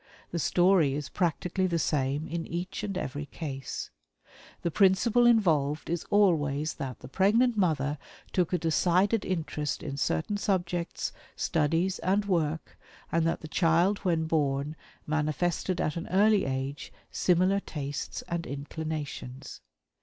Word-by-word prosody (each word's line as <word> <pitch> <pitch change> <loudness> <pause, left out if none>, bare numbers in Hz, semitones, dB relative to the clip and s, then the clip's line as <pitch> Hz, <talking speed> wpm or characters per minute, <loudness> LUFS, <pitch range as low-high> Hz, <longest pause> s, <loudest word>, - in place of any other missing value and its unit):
The 170 - -2
story 165 -1 +3
is 150 -1 -4
practically 180 +1 0
the 170 -2 0
same 145 -1 0
in 165 0 -4
each 175 +4 -4
and 200 -3 -3
every 145 -2 -4
case. 135 -4 -5 0.7
The 170 - 0
principle 210 +6 +4
involved 160 -10 +2
is 170 -1 -2
always 155 -7 +2
that 130 -4 -6
the - - -9
pregnant 220 - +3
mother 150 -7 +1 0.3
took 180 -3 +1
a 180 - +2
decided 180 +6 +2
interest 155 -5 -2
in 140 -3 -4
certain 165 +8 0
subjects, 175 -4 -1 0.2
studies, 165 +4 +1
and 200 +3 +1
work, 160 -5 -1 0.3
and 165 0 +2
that 165 - -1
the 155 - -7
child 170 +5 +3
when 165 -4 +1
born 145 -2 0 0.3
manifested 155 +4 0
at 150 - 0
an 170 - -4
early 205 +2 +4
age 135 +1 -3 0.2
similar 185 +2 +3
tastes 145 -6 -5
and 170 -1 -4
inclinations. 145 -2 -6
165 Hz, 135 wpm, -29 LUFS, 150-185 Hz, 0.7 s, principle